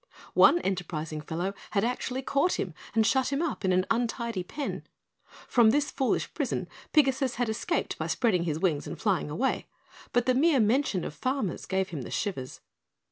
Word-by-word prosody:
One - - +7
enterprising 160 -5 -3
fellow 175 +5 -3 0.2
had 200 -1 +1
actually 250 +2 -2
caught 280 +7 +2
him 180 - -2 0.2
and 220 -1 +4
shut 265 +3 +2
him 275 - 0
up 330 -8 -2
in 190 - +2
an 185 0 +3
untidy 235 -3 -1
pen. 285 +11 -4 0.7
From 235 -3 +5
this 290 +5 +2
foolish 265 - 0
prison - - -2 0.2
Pigasus 270 -4 +3
had 245 -2 0
escaped 235 +10 -2
by - - -2
spreading 190 -8 +1
his 155 -3 -1
wings 160 -4 0
and 165 - -6
flying 190 -8 0
away, 255 - -1 0.4
but 245 -1 +2
the 255 - +3
mere 285 +2 +4
mention 220 -4 +2
of - - -5
farmer 255 - -1
gave 190 0 0
him 155 -5 -5
the - - -7
shivers. 135 -12 -3
225 Hz, 180 wpm, -28 LUFS, 180-265 Hz, 0.7 s, One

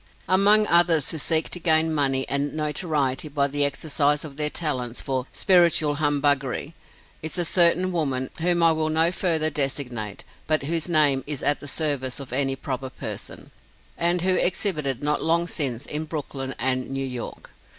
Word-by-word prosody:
Among 200 +4 +4
others 170 -5 +3
who 160 - -3
seek 160 +2 +1
to 180 - -3
gain 160 -1 +2
money 135 -3 0
and 140 +2 -2
notoriety 150 -2 -1
by 145 -1 0
the 145 +1 +1
exercise 145 +1 +1
of 145 -3 -10
their 150 0 -1
talents 130 -7 -2
for 130 -1 -3
"spiritual" 170 -5 +3
humbuggery, 145 -1 0 0.5
is 160 +3 -4
a 175 - 0
certain 180 +2 +4
woman, 135 -7 -2
whom 170 +1 +2
I 165 - +6
will 155 -1 -1
not 160 +2 +2
further 160 -4 0
designate, 125 -7 -3 0.2
but 155 -2 +1
whose 165 +3 -2
name 145 -5 +3
is 145 -2 -3
at 145 - +1
the 145 - -10
service 140 -4 -1
of 135 -3 -8
any 135 0 +1
proper 130 0 -5
person, - - -8 0.4
and 175 +1 +1
who 185 0 +2
exhibited 155 - 0
not 150 0 0
long 170 +1 +1
since 135 -8 -2
in 155 +1 -4
Brooklyn 140 -4 -6
and 130 +1 0
New 135 0 -3
York. 125 -2 -7
150 Hz, 170 wpm, -24 LUFS, 135-165 Hz, 0.5 s, I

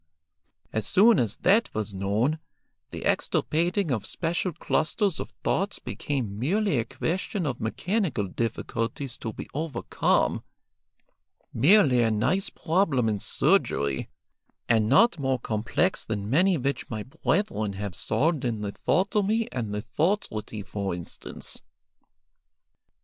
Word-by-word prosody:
As 110 -2 -1
soon 215 +2 +6
as 115 -3 0
that 210 +5 +4
was 105 -1 -2
known, 105 +11 0 0.5
the - - -7
extirpating 170 +2 +1
of 110 -5 0
special 170 +2 -1
clusters 170 +4 0
of - - -5
thoughts 195 +1 0
became 120 -8 -4
merely 180 - +1
a 115 - -1
question 180 - -2
of 130 -4 -3
mechanical 175 - -1
difficulties 115 +4 -3
to 110 - -4
be - - -8
overcome, 150 -4 0 1.1
merely 140 - +5
a 115 - +3
nice 115 - +1
problem 160 - +1
in 105 -2 0
surgery, 70 -7 +1 0.6
and 110 -2 +3
not 175 - +5
more 135 -1 +1
complex 115 - 0
than 105 -2 -3
many 180 +5 +4
which 140 +1 -2
my 110 -3 -4
brethren 125 - -1
have 100 -1 -4
solved 150 - 0
in 115 -4 -1
lithotomy 200 - +1
and 120 -4 -3
lithotrity, 110 - -2
for 100 -3 -3
instance." 85 -1 -6
130 Hz, 120 wpm, -26 LUFS, 110-180 Hz, 1.1 s, soon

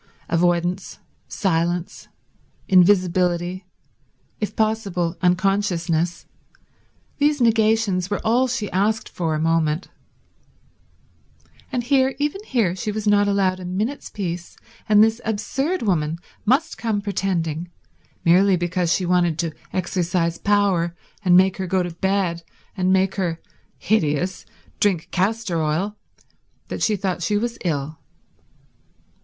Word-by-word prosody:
Avoidance, 175 +2 0 0.3
silence, 175 -2 -1 0.6
invisibility, 180 -1 +3 0.7
if 210 - -3
possible 200 -6 0
unconsciousness—these 185 - -2
negations 220 -5 +2
were 205 - -1
all 245 +4 +3
she 235 -4 -3
asked 210 +4 0
for 165 -3 -2
a - - -2
moment; 160 +1 0 1.8
and 245 -1 -1
here, 265 +1 +2
even 295 +8 -2
here, 220 - +1
she 210 +3 -3
was 215 0 -4
not 205 -1 +4
allowed 195 -2 +1
a 180 - -7
minute's 210 +10 -3
peace, 175 -3 -5 0.3
and 210 0 +7
this 225 +2 +1
absurd 270 - -2
woman 165 -6 0 0.3
must 290 +8 +2
come 220 -3 0
pretending, 175 -5 -2 0.6
merely 185 +3 +5
because 175 0 -1
she 185 - +1
wanted 175 -3 +2
to 165 -2 -2 0.2
exercise 175 -2 -1
power 195 -5 +1 0.3
and 180 -2 +6
make 190 0 +4
her 190 -1 -3
go 185 0 +1
to 175 - -4
bed 190 -1 0 0.3
and 185 -1 +1
make 190 0 +2
her—hideous—drink 180 0 -2
castor 195 -2 0
oil, 165 +7 -1 0.7
that - - -5
she 215 - +2
thought 185 -2 -2
she 205 +5 +1
was 235 +2 -3
ill. 155 -3 -2
185 Hz, 115 wpm, -22 LUFS, 175-210 Hz, 1.8 s, and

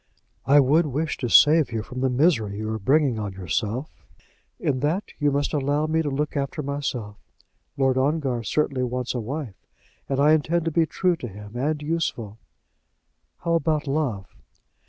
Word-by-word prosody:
"I 145 +2 +7
would 150 +4 +4
wish 150 +3 -2
to 125 - -3
save 150 +2 +6
you 110 -2 -2
from 125 +3 -7
the 130 - +2
misery 125 - +2
you 110 +1 -3
are 110 - -3
bringing 135 +1 +2
on 100 -2 -4
yourself." 105 - -3 0.7
"In 130 -3 0
that 155 +9 -1
you 145 -1 +3
must 140 0 -1
allow 145 +1 +1
me 160 +1 +1
to 150 - -2
look 145 +3 -2
after 140 +2 -2
myself. 135 -7 -4 0.6
Lord 135 -1 +2
Ongar 135 -3 0
certainly 135 +2 0
wants 125 0 -2
a 125 - -2
wife, 125 -2 -6 0.4
and 135 0 0
I 145 +2 +5
intend 155 +2 +1
to 165 - 0
be 165 0 +2
true 180 +1 +1
to 125 - -6
him, 105 +1 -11
and 145 +5 -1
useful." 135 -9 -3 1.0
"How 170 -1 0
about 160 -2 +1
love?" 135 -9 -2
140 Hz, 175 wpm, -24 LUFS, 120-155 Hz, 1.0 s, I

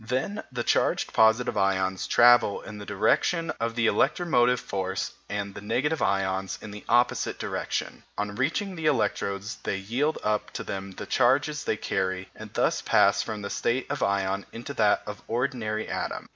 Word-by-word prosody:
Then 135 - -1
the 120 -2 -2
charged - - +1
positive 110 +3 +4
ions 95 -1 +1
travel 120 -3 +5
in 105 -1 -9
the 100 - -9
direction 160 - +1
of 115 0 -2
the 115 -1 +1
electromotive 125 -3 +3
force 95 -4 -3 0.2
and 100 -1 -3
the - - -8
negative 150 +9 0
ions 95 -1 0
in 105 - -9
the 105 0 -9
opposite 120 +1 +2
direction. - - -3 0.2
On 105 0 -2
reaching 160 - -1
the 160 -2 -2
electrodes 105 -6 -1
they 95 - -2
yield 125 +11 -1
up 105 0 0
to - - -4
them 95 0 -5
the - - -7
charges 140 +4 +2
they 110 - 0
carry, 95 -1 -2
and - - -10
thus - - +1
pass 100 - +4
from 105 -2 -5
the 100 - -4
state 125 +2 0
of 145 - -3
ion 100 0 0
into 120 +5 -7
that 105 -5 +3
of 105 -1 -7
ordinary 115 -3 -1
atom. - - -4
110 Hz, 170 wpm, -27 LUFS, 100-125 Hz, 0.2 s, travel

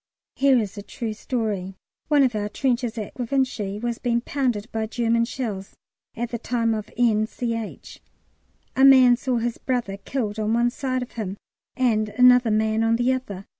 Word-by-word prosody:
Here 270 -1 +4
is 210 -2 -2
a - - -5
true 225 +2 -5
story. 210 -5 -3 0.3
One 290 -1 +4
of 255 -3 +2
our 210 -1 -2
trenches 240 -1 -1
at 210 -2 -5
Givenchy 245 -5 -1
was 235 +1 -3
being 235 -1 0
pounded 245 -6 -1
by 220 -1 -2
German 230 0 +1
shells 220 -6 -5 0.4
at 235 +1 -4
the 235 - -3
time 230 -1 0
of 215 -1 -4
N. 220 -3 +3
Ch. 230 -2 -5 0.7
A 265 - +3
man 260 -2 +8
saw 250 0 -1
his 235 0 -2
brother 240 -7 -2
killed 215 -1 -3
on 215 +1 +1
one 240 +1 +2
side 255 -1 -2
of 245 - -11
him 205 -4 -5 0.4
and 220 -5 +2
another 250 +2 +5
man 220 +1 +1
on 225 0 +3
the 245 +2 +2
other. 205 -7 -5
230 Hz, 175 wpm, -24 LUFS, 215-250 Hz, 0.7 s, man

